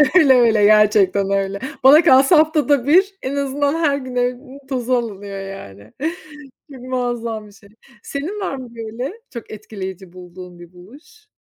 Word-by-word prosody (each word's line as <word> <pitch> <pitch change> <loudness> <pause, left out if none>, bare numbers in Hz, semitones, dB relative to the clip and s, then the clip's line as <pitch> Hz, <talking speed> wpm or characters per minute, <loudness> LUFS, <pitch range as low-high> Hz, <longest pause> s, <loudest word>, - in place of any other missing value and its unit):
Öyle, 285 -7 +6
öyle 225 -4 +4
gerçekten 205 -2 +3
öyle. 195 0 -1 0.2
Bana 300 +5 +7
kalsa 270 +5 +5
haftada 295 -4 +2
bir, 385 +5 +3
en 270 +2 -4
azından 280 +1 -1
her 295 -4 +1
gün 255 -2 -8
evin 250 +2 -3
tozu 255 -2 -2
alınıyor, 205 -4 -3
yani. 110 - -10 0.8
Çok 260 -2 -11
muazzam 240 -4 -4
bir - - -17
şey. 200 0 -20 0.3
Senin 330 +10 -5
var 330 -8 -3
mı 255 -2 -9
böyle, 230 - -6 0.2
çok 235 - -9
etkileyici 190 -4 -9
bulduğun, 180 -1 -12
bir 175 +1 -14
buluş? 285 - -18
240 Hz, 155 wpm, -19 LUFS, 200-280 Hz, 0.8 s, Bana